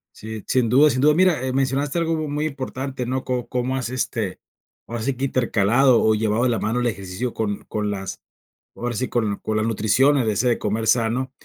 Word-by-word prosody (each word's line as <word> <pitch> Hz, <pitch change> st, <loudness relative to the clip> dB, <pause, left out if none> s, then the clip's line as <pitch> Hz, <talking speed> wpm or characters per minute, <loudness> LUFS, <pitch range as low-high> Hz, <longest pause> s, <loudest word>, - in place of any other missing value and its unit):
Sí, 110 Hz, -1 st, -7 dB
sin 125 Hz, -2 st, +1 dB
duda 140 Hz, +6 st, +6 dB
sin 130 Hz, -1 st, 0 dB
duda. 150 Hz, +2 st, +5 dB
Mira, 175 Hz, -4 st, +3 dB
eh, 130 Hz, -, -2 dB
mencionaste 135 Hz, +3 st, 0 dB
algo 165 Hz, -1 st, +1 dB
mu 155 Hz, -1 st, -3 dB
muy 150 Hz, +1 st, -2 dB
importante, 135 Hz, -2 st, -4 dB
¿no?, 130 Hz, +2 st, -2 dB
co 125 Hz, -2 st, -2 dB
cómo 125 Hz, +2 st, -1 dB
has, 125 Hz, -3 st, -3 dB
este, 115 Hz, -6 st, -3 dB, 0.5 s
ahora 120 Hz, 0 st, -4 dB
sí 135 Hz, +2 st, -1 dB
que, 130 Hz, +2 st, -2 dB
intercalado 120 Hz, 0 st, +3 dB
o 110 Hz, -, +4 dB
llevado 110 Hz, +2 st, +1 dB
de 125 Hz, -, +3 dB
la 115 Hz, -4 st, 0 dB
mano 115 Hz, +3 st, -1 dB
el 120 Hz, -, +1 dB
ejercicio 100 Hz, +3 st, -4 dB
con 105 Hz, -2 st, -3 dB
con 105 Hz, -1 st, -2 dB
las, 95 Hz, -2 st, -5 dB, 0.5 s
ahora 120 Hz, 0 st, -3 dB
sí, 130 Hz, +4 st, -1 dB
con 110 Hz, -4 st, 0 dB
co 110 Hz, -, -3 dB
la 110 Hz, -, +1 dB
nutrición, 115 Hz, +6 st, +3 dB
el 120 Hz, -5 st, +1 dB
ese 110 Hz, +4 st, +1 dB
de 120 Hz, -, +1 dB
comer 110 Hz, +2 st, -2 dB
sano. 120 Hz, +3 st, +1 dB
120 Hz, 220 wpm, -22 LUFS, 110-135 Hz, 0.5 s, duda